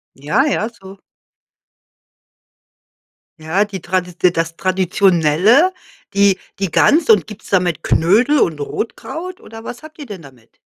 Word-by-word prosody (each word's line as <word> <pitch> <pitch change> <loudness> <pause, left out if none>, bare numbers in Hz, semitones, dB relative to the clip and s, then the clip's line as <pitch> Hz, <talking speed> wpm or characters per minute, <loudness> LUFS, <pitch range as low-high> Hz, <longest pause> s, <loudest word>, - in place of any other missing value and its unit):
Ja, 150 - 0
ja, 230 -7 -1
so. 195 -4 -14 2.4
Ja, 170 +7 0
die 195 -3 -7
Tradit 180 0 -1
das 165 0 -2
Traditionelle, 185 - +3 0.4
die 200 -1 +3 0.2
die 195 -2 -1
Gans 305 - +3
und 210 -8 +5
gibt's 210 0 -12
da 190 - +4
mit 175 -5 -2
Knödel 220 - +3
und 160 -8 0
Rotkraut 340 - -6
oder 225 0 -11
was 240 - -8
habt 310 +1 -14
ihr 295 - -8
denn 205 -7 -9
damit? 130 -6 -18
190 Hz, 135 wpm, -17 LUFS, 170-230 Hz, 2.4 s, und